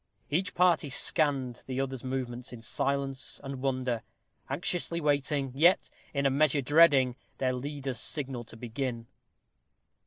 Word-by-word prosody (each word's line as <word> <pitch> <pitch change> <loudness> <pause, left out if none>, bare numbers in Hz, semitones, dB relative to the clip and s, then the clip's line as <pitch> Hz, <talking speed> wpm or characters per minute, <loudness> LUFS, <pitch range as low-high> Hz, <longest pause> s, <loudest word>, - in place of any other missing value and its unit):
Each 180 +5 0
party 170 -5 +3
scanned 135 -4 0
the 130 0 -3
other's 135 -2 -3
movements 130 -1 -4
in 120 -2 -9
silence 135 +2 -1
and 135 -1 -6
wonder, 130 -3 0 0.5
anxiously 170 -1 -1
awaiting, 145 -3 +1
yet 170 +7 +4 0.2
in 140 -1 -1
a 135 - +4
measure 145 +1 +3
dreading, 140 -3 +5 0.2
their 130 -1 +1
leader's 135 -1 -4
signal 135 -5 -1
to 115 - -12
begin. 120 0 -4
135 Hz, 130 wpm, -30 LUFS, 125-145 Hz, 0.5 s, dreading